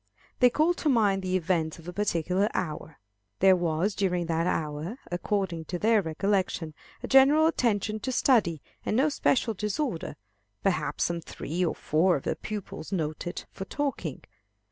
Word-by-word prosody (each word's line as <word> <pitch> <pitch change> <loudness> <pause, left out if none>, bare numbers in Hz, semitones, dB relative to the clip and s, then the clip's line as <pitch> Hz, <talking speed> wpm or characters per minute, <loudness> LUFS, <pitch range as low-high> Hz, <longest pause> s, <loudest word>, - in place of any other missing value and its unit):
They 250 - +7
call 310 +7 +2
to 320 - -1
mind 205 -6 +3
the 185 0 0
events 165 -3 -1
of 165 0 -14
a 180 - -5
particular 185 0 0
hour. 160 -3 -4 0.4
There 190 0 +6
was 175 +3 0
during 180 -3 0
that 165 +1 0
hour, 155 - -2
according 175 -2 -2
to 180 - -4
their 220 +3 +3
recollection, 180 -1 -1 0.3
a - - -3
general 275 +4 +6
attention 215 - +1
to 260 - -3
study, 210 - +2 0.2
and 215 - 0
no 285 +4 +4
special 245 -5 +1
disorder; 210 - -3 0.5
perhaps 195 -2 0
some 170 -1 -1
three 165 +2 -4
or 170 - 0
four 175 +4 +2
of 135 - -4
the - - -1
pupils 210 -5 -7
noted 165 -1 -3
for 195 - -7
talking. 285 +5 -3
185 Hz, 160 wpm, -28 LUFS, 165-220 Hz, 0.5 s, They